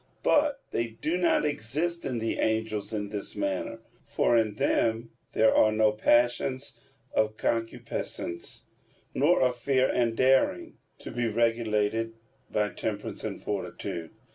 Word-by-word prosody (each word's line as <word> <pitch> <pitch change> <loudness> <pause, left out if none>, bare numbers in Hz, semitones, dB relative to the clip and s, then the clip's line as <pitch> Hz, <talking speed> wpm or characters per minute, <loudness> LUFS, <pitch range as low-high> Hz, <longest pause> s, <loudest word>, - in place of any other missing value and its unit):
But 290 -2 +3
they 115 - 0
do 160 +3 0
not 175 -3 +2
exist 150 +6 -2
in 125 - -2
the 115 0 -2
angels 110 -1 -1
in 105 -2 -3
this 105 -1 -5
manner. 100 +3 -2 0.3
For 120 - +2
in 110 -3 +2
them 115 +2 +1 0.2
there 110 - +4
are 110 - +5
no 110 0 +3
passions 120 +4 +1 0.4
of 110 0 +1
concupiscence, 115 -6 -3 0.5
nor 150 +2 +3
of 125 -1 +2
fear 130 +1 +2
and 115 -2 +1
daring, 130 +1 +2 0.2
to - - -8
be 120 -1 -1
regulated 115 -1 +1 0.3
by 105 0 +1
temperance 105 -1 -4
and - - -4
fortitude. 95 -4 -4
115 Hz, 135 wpm, -28 LUFS, 110-125 Hz, 0.5 s, are